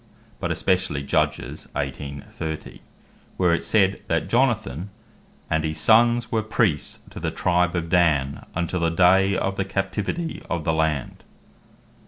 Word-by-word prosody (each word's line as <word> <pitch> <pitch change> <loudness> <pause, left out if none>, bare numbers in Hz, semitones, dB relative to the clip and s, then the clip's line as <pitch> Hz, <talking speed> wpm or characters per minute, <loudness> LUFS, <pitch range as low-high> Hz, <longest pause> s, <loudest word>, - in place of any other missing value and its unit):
but - - -2
especially 90 -7 0
Judg. 70 - +1 0.4
18. 70 0 -4
30. 80 -1 -6 0.6
where 90 -2 +3
it 85 - +2
is - - -8
said, 100 -3 +3
that 85 -1 0
Jonathan 110 - 0 0.6
"and 80 0 0
his 80 0 -2
sonnes 120 +1 +4
were 110 - +1
Priests 105 -7 0
to - - -8
the - - -1
Tribe 90 0 +1
of 85 -1 -1
Dan, 80 -6 +2
untill 85 +2 -1
the 85 0 +2
day 95 +3 +4
of 95 0 -1
the 95 - +1
captivity 105 - -3
of 85 -3 -2
the 80 - +1
land." 80 -5 -1
90 Hz, 150 wpm, -24 LUFS, 80-100 Hz, 0.6 s, sonnes